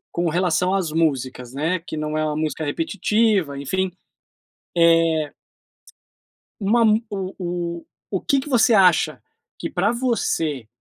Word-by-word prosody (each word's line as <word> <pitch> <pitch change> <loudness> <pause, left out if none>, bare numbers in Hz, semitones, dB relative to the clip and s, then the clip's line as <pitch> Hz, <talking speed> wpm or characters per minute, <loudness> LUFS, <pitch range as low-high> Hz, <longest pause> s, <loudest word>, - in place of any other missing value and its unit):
Com 170 -1 +1
relação 180 +2 +1
às 180 -5 0
músicas, 130 -6 -1
né. 160 +6 0
Que 155 - -6
não 155 0 -2
é 155 - 0
uma 150 0 -1
música 155 0 -2
repetitiva, 185 0 0
enfim. 190 +6 -1 0.9
Eh 165 -2 +3 1.3
uma 230 +4 +3
mu 215 0 +5
o 200 -2 -4 0.2
o 175 -2 -3 0.6
o 190 - -2
que 275 - +2
que 280 +2 -7
você 235 -2 +4
acha 185 -4 +4 0.4
que - - -4
pra 200 +4 +1
você, 165 - -1
170 Hz, 140 wpm, -22 LUFS, 155-200 Hz, 1.3 s, mu